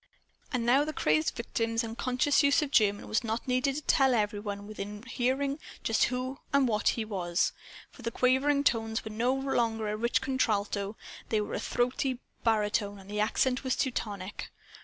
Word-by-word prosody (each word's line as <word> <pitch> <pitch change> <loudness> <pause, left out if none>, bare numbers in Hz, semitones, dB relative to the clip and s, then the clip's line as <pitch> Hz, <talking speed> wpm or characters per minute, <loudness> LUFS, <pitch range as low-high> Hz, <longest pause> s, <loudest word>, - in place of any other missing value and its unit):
And 250 -4 -1
now 260 +4 +5
the 310 +1 -4
crazed 155 - +1
victim's 230 0 -1
unconscious 250 +5 +1
use 280 +1 +4
of 280 - -4
German 205 -5 +3
was 215 - 0
not 230 +3 -3
needed 255 +2 +1
to 300 - -3
tell 265 -3 +4
every 210 -2 0
one 205 -1 -5
within 210 0 -7
hearing 265 +4 -1 0.2
just 225 - +3
who 255 +2 -3
and 280 -2 +4
what 215 -2 0
he 225 - -1
was. 180 -5 0 0.4
For - - -14
the 230 - -2
quavering 265 +4 +2
tones 225 -4 0
were 220 - -5
no 235 +4 +1
longer 230 -5 0
a 210 - -1
rich 235 +2 +1
contralto. 215 -6 -1 0.3
They 220 - +2
were 210 - -3
a - - -1
throaty 250 +1 0 0.3
baritone. 210 -2 +1
And 195 +1 -12
the 210 - -2
accent 250 +5 +1
was 260 -1 0
Teutonic. 205 -7 -3
230 Hz, 180 wpm, -30 LUFS, 210-260 Hz, 0.4 s, now